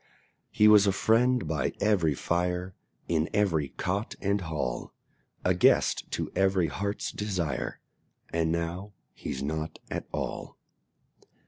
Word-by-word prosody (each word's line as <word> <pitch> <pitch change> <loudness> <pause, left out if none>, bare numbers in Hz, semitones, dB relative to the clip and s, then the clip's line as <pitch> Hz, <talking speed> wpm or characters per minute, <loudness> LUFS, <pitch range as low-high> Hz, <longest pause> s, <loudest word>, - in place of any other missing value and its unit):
He 105 - +4
was 105 -1 +7
a - - +5
friend 115 0 +2
by 75 -5 -1
every 90 -8 +2
fire, 90 +4 -1 0.3
In 80 0 +1
every 85 -9 +2
cot 100 - -3
and 100 0 0
hall 75 -7 -3 0.5
A - - +4
guest - - +3
to - - -2
every 95 -4 +2
heart's 100 +5 -3
desire, 95 -7 -2 0.5
And 80 -1 +1
now 85 +5 -3 0.2
he's 65 +1 -5
nought 80 +2 -3
at - - -4
all. - - -4
90 Hz, 125 wpm, -28 LUFS, 80-100 Hz, 0.5 s, was